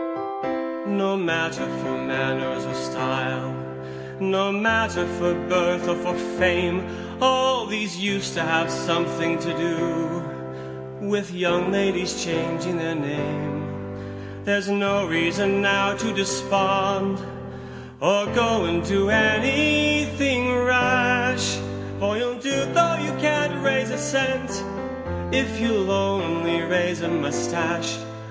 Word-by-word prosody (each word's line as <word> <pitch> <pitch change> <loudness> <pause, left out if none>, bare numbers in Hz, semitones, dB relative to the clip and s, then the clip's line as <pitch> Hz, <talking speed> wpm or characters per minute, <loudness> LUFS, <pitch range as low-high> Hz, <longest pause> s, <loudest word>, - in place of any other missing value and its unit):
2. 65 0 -4
No 195 0 0
matter 165 - -1
for 65 0 -3
manners 65 0 -2
or 65 - -5
style, 65 0 -3 0.7
No 195 +1 +1
matter 220 -3 +2
for 175 0 +1 0.2
birth 180 -1 +2
or 175 - +1
for 180 - -2 0.2
fame, 180 0 +2 0.4
All 260 0 +3
these 210 -4 -3
used 200 +1 -1
to 165 - -1
have 165 0 +1
something 65 - 0
to 170 - -3
do 65 - -4
With 205 -1 -1
young 180 0 +1
ladies 195 -2 0
changing 165 +1 -2
their 165 0 -2
name, 145 -1 -3 0.8
There's 200 0 +1
no 200 0 +1
reason 180 +5 +2
now 200 0 +3
to - - -2
despond, 195 0 +1 0.8
Or 205 +2 +3 0.2
go 230 -2 +2
and 170 0 0
do 195 0 +2
any 290 +8 +4
thing 250 -3 +2
rash, 250 - +3 0.4
For 210 +1 0
you'll 245 +1 -2
do 265 +3 -3 0.3
though 340 0 +5
you - - -2 0.2
can't 295 0 +1
raise 270 -1 +2
a - - -2
cent, 265 -1 0 0.8
If 90 - 0
you'll 215 -5 +1
only 170 -4 0
raise 175 +1 0
a 170 - -2
moustache! 120 -3 -1
185 Hz, 120 wpm, -23 LUFS, 165-205 Hz, 0.8 s, though